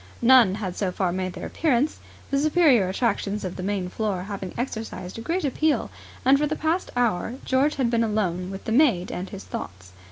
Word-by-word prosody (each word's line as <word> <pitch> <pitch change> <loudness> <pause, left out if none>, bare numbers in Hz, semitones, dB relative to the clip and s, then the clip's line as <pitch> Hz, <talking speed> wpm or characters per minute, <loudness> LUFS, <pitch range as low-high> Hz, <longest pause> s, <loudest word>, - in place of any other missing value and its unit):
None 235 -6 +6
had 190 -4 -4
so 195 -3 -1
far 180 -1 0
made 185 0 -3
their - - -7
appearance, 295 -2 0 0.3
the 275 - +2
superior 295 - +4
attractions 210 -1 -1
of 180 - -4
the - - -6
main 190 -1 -2
floor 195 -1 -2
having 195 -2 -6
exercised 220 -6 -5
a - - -6
great 335 +7 -1
appeal; 300 +3 0 0.3
and 270 +2 +6
for 300 - +1
the 310 - -2
past 320 +4 -1
hour 235 -2 0
George 270 +3 +2
had 255 -4 0
been 230 -1 +2
alone 185 -5 -1
with 195 0 -7
the - - -3
maid 230 - +3
and 185 +2 -5
his 195 -1 -8
thoughts. 95 +1 -7
220 Hz, 200 wpm, -25 LUFS, 185-265 Hz, 0.3 s, None